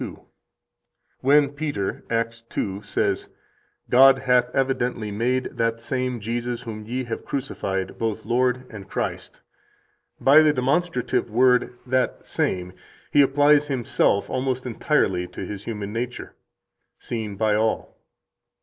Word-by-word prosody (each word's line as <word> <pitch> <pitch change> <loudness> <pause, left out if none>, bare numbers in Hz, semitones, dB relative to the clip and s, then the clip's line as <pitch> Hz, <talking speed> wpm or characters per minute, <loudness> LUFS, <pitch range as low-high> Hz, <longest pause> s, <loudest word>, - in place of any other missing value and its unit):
661): - - -7 0.9
"[When 140 +1 +4
Peter, 145 -10 -3
Acts 115 0 -1
2, 100 0 -3
says:] - - -1 0.6
'God 135 +2 +7
hath 125 -2 +2
evidently 125 -5 -1
made 125 +5 0
that 115 0 0
same 125 0 -2
Jesus 120 +2 -3
whom 110 -2 -7
ye 125 +2 -2
have 115 -2 -5
crucified 100 -9 -3
both 110 -1 -2
Lord 125 +2 +1
and 100 -3 -10
Christ,' - - -4 0.8
by 145 +3 +7
the 155 -1 +4
demonstrative 130 -2 0
word 125 +2 +3
[that 130 0 0
same] 90 -1 -2 0.4
he 145 - +6
applies 145 +2 +4
himself 120 -6 +1
almost 130 0 -2
entirely 105 -8 0
to 90 - -7
His 100 -1 -7
human 105 -2 -5
nature, 120 +2 -4 0.6
seen 110 -4 -5
by 110 +1 +1
all." 110 +1 0
125 Hz, 125 wpm, -24 LUFS, 110-130 Hz, 0.9 s, God